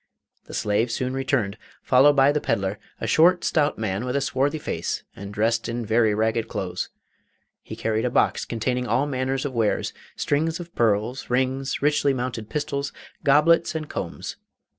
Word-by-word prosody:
The - - -8
slave 110 +3 +1
soon 130 +2 -2
returned, 130 -6 -1 0.2
followed 135 +3 +5
by 135 0 +5
the 150 0 0
pedlar, 100 +1 -1 0.2
a - - -3
short 175 +2 +4
stout 150 -3 +1
man 105 -1 -2
with 125 +1 -2
a 140 - +2
swarthy 140 +2 0
face, 85 - -3
and 100 0 -8
dressed 115 +2 0
in 120 0 -3
very 110 -1 +3
ragged 110 +1 0
clothes. 90 -1 -3 0.7
He - - -8
carried 110 +1 -1
a - - +2
box - - +2
containing 125 +2 -2
all 135 - +2
manner 130 -2 -1
of 135 0 -3
wares 115 -3 0 0.2
strings 160 +3 0
of 170 -1 -9
pearls, 115 +3 0
rings, 130 +2 0
richly 145 -2 +3
mounted 120 -3 -4
pistols, 145 -2 -2 0.3
goblets, 160 +4 +4
and 155 -1 -3
combs. - - -5
130 Hz, 165 wpm, -24 LUFS, 110-145 Hz, 0.7 s, followed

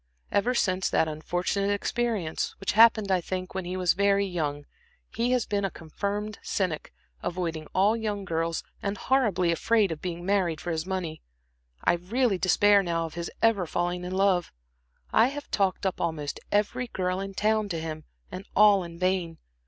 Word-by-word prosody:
Ever 240 +5 +2
since 185 -4 +1
that 160 - +2
unfortunate 175 +6 -1
experience, 205 -4 -1
which 195 - -1
happened, 220 -2 +5
I 185 -1 +3
think, 185 +1 -4
when 190 -1 -3
he 180 +1 -3
was 180 -2 +3
very 200 +1 +3
young, 150 -6 -3 0.5
he 235 +2 0
has 250 -4 +1
been 200 -1 -1
a 195 - +1
confirmed 205 +6 -4
cynic, 180 -6 -2 0.3
avoiding 165 -3 -3
all 200 +4 +4
young 210 -3 -3
girls, 165 -1 -1 0.2
and 200 0 -2
horribly 210 -11 +2
afraid 205 +3 +2
of 155 - -5
being 175 -1 -5
married 185 -5 +1
for 175 - -4
his 160 +1 -2
money. 180 -5 -3 0.6
I - - +4
really 195 +4 0
despair 200 +2 +5
now 170 -3 -1
of 160 - -8
his 170 0 -4
ever 210 -6 +3
falling 175 +2 -1
in 180 +1 -4
love; 190 -2 +2 0.6
I 225 - +6
have 285 +2 -7
talked 195 -1 0
up 190 - -1
almost 155 -4 -2
every 215 +5 +1
girl 185 -3 -2
in 195 0 -5
town 215 0 +1
to 170 -3 -2
him, 155 -1 -6 0.3
and 185 +2 -7
all 205 -2 +6
in 170 -1 -9
vain. 180 -2 0
185 Hz, 175 wpm, -27 LUFS, 170-205 Hz, 0.6 s, I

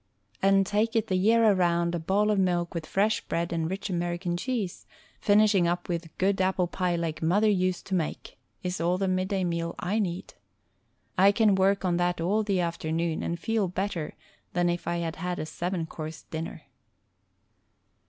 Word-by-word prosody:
And 195 0 +4
take 215 +4 0
it 225 - +1
the 185 - +1
year 225 +5 +4
around 170 -2 +2
a 175 - -1
bowl 200 +6 +2
of 205 - +2
milk 175 -2 +1
with 165 -2 -4
fresh 210 +3 +1
bread 170 +1 -2
and 165 -1 -1
rich 190 +2 -4
American 175 -1 -2
cheese, 210 -2 -3 0.3
finishing 205 -4 +4
up 175 +1 -1
with 170 -2 -4
"good 190 0 +1
apple 185 -1 +2
pie 180 0 -1
like 165 -2 -3
mother 190 +7 +3
used 185 -2 0
to 190 - -5
make," 165 -4 -3 0.2
is 180 -1 -2
all 175 +2 +2
the 195 0 0
midday 185 +1 0
meal 170 -1 -2
I 200 +5 -1
need. 185 -3 -3 0.9
I 195 +2 +7
can 215 -1 +3
work 195 +1 +2
on 175 -1 +2
that 175 0 0
all 195 +6 +1
the 200 -3 0
afternoon 165 -1 -1
and 170 0 -3
feel 220 +2 0
better 180 -3 -3 0.4
than 175 0 +2
if 175 0 -3
I 170 - 0
had 165 -1 -3
had 180 +1 -3
a - - -3
seven 175 +1 -3
course 155 0 -7
dinner. 160 +1 -6
180 Hz, 185 wpm, -27 LUFS, 170-195 Hz, 0.9 s, I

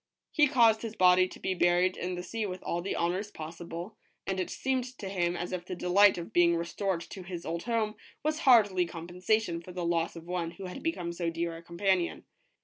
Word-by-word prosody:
He 295 -2 +5
caused 230 -5 +4
his 225 -1 -5
body 185 0 +5
to - - -12
be 190 - -1
buried 175 +1 +3
in 180 0 -3
the 180 - -5
sea 220 +4 -3
with 185 -1 -6
all 170 - -2
the 195 - -3
honors 185 +5 -1
possible, 170 +4 -7 0.3
and 190 -1 -2
it 185 - -2
seemed 255 -1 -2
to 200 - -6
him 175 -2 0
as 175 - -4
if 180 -1 -3
the 180 +1 -5
delight 190 +3 +5
of 170 - -7
being 170 -1 +5
restored 170 +2 -2
to 190 +3 -9
his 175 -1 -7
old 170 +1 -3
home 225 -3 0 0.3
was 310 +1 0
hardly 205 - +5
compensation 175 +2 -1
for 180 - -10
the 175 -1 -3
loss 170 0 0
of 165 -1 -9
one 175 -1 -2
who 190 +3 -9
had 180 - -7
become 175 - -2
so 170 -1 -1
dear 165 0 -3
a 165 - -9
companion. 175 +1 0
180 Hz, 220 wpm, -30 LUFS, 170-205 Hz, 0.3 s, He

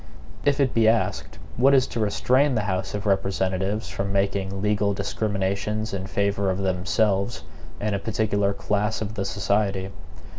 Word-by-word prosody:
If 145 -1 +2
it 135 -3 +2
be 115 -1 +4
asked, 115 0 0 0.2
what 135 +3 +5
is 130 -1 +4
to 115 - -2
restrain 130 +6 +2
the 110 - +1
House 95 0 -2
of 100 - -4
Representatives 95 +1 0
from 100 0 -3
making 100 -1 0
legal 105 -1 +1
discriminations 100 +1 -2
in 95 -1 -3
favor 100 0 0
of 95 - 0
themselves 100 +3 0 0.4
and 105 0 -1
a 100 - 0
particular 100 -2 0
class 105 +2 -1
of 105 0 -5
the 100 -3 -3
society? 100 -2 0
100 Hz, 155 wpm, -24 LUFS, 95-110 Hz, 0.4 s, what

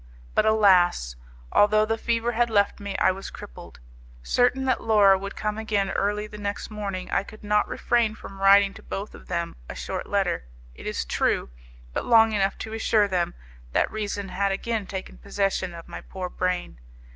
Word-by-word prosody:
But, - - +3
alas! 180 - +4 0.4
although 215 +1 +4
the 225 +1 0
fever 230 +1 0
had 240 +1 +1
left 205 -2 +2
me, 200 -1 -4
I - - +4
was 190 +1 -7
crippled. - - -11 0.4
Certain 250 - +2
that 260 - +1
Laura 210 -3 +6
would 200 +1 -5
come 210 0 -2
again 205 -3 0
early 210 +1 0
the 210 0 -10
next 205 +1 -4
morning, 200 -3 -5
I - - +2
could 215 +2 -13
not 210 0 +2
refrain 230 -3 +1
from 195 -2 -11
writing 195 0 +6
to 220 - -12
both 200 0 -6
of - - -14
them 170 -1 -3
a - - -6
short - - -4
letter, 60 - 0 0.3
it - - -10
is - - -2
true, - - 0 0.4
but - - -2
long 225 -2 +6
enough 195 -2 0
to 220 - -8
assure 220 -1 +2
them 180 -3 -1 0.4
that - - +2
reason 205 -2 -3
had 195 +2 0
again 215 +1 -2
taken 190 -1 -7
possession 195 -2 -1
of 165 - -10
my - - -8
poor 185 -1 -6
brain. 180 - -2
200 Hz, 185 wpm, -25 LUFS, 195-220 Hz, 0.4 s, Laura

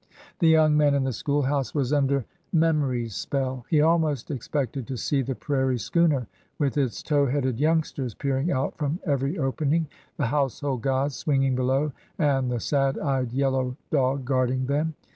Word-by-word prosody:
The 165 - +4
young 155 -1 +5
man 145 -1 +4
in 140 - +1
the 130 -1 -1
school 145 +5 0
house 135 +1 -1
was 140 -1 0
under 140 -3 +2 0.3
Mem 160 -2 +3
ory's 120 -5 -2
spell. 130 -3 -3
He 155 -3 +4
almost 155 -4 +1
expected 135 -1 -3
to 130 -2 -4
see 140 +3 0
the 130 0 -3
prairie 130 +1 0
schooner 135 +4 +1 0.3
with 140 -3 0
its 135 -5 -1
tow 145 -2 +2
headed 130 -2 -1
youngsters 150 -6 0
peering 140 +4 -1
out 135 +1 -1
from 150 +3 -1
every 140 +2 0
opening, 150 +3 0 0.3
the 145 - 0
household 135 0 -1
gods 135 +2 0
swinging 135 -3 +1
below, 130 +4 +1 0.3
and 135 -5 +1
the 120 -1 -1
sad 135 +1 +1
eyed 135 -4 -1
yellow 130 -1 0
dog 135 -2 +1
guarding 130 0 +1
them. 150 +4 -1
140 Hz, 170 wpm, -25 LUFS, 130-150 Hz, 0.3 s, young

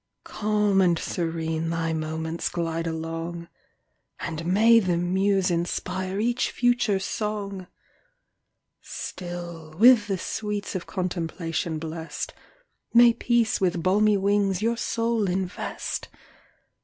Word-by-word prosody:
Calm 210 -2 +1
and 175 -2 +3
serene 165 -1 -2
thy 165 -1 -1
moments 160 +1 -3
glide 165 -1 -2
along, 165 +1 -4 0.7
And 165 0 -4
may 225 +5 +6
the 180 -5 0
muse 190 +2 +1
inspire 185 +2 -2
each 240 +3 +1
future 240 -4 +2
song! 200 -1 -3 1.1
Still, 170 -3 -7
with 230 -1 +7
the 195 -2 -1
sweets 210 +2 -3
of 185 -3 -4
contemplation 170 -3 -2
bless'd, 160 +1 -5 0.6
May 235 0 +7
peace 235 -3 +1
with 175 -3 +1
balmy 205 +3 +4
wings 200 -1 +1
your 230 +3 +1
soul 230 -3 0
invest! 185 0 -3
185 Hz, 105 wpm, -25 LUFS, 165-210 Hz, 1.1 s, with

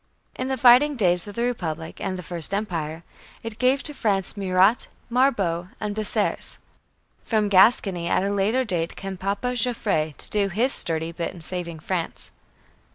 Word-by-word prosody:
In 255 - -4
the 265 0 -1
fighting 255 +4 +6
days 180 -5 +3
of 205 - -9
the 235 - -1
Republic 165 -9 -4
and 190 -1 -3
the 180 - -7
First 175 +2 -3
Empire, 165 -6 -3 0.4
it 225 -1 -7
gave 260 +2 +2
to 295 - -4
France 195 -8 -1
Murat, 195 +3 +2 0.2
Marbot, 200 -10 +1
and 210 -1 -3
Bessières. 215 -1 -1 0.7
From 215 -3 0
Gascony 190 -3 +4
at 185 - +1
a 200 - -1
later 210 +6 +1
day 175 -8 -1
came 195 +2 -7
"Papa" 200 +7 -2
Joffre 210 - 0
to - - -6
do 205 -2 +1
his 235 +8 +1
sturdy 165 0 +2
bit 170 +1 -5
in 170 - -11
saving 170 -1 -6
France. 175 0 -4
195 Hz, 165 wpm, -24 LUFS, 175-230 Hz, 0.7 s, fighting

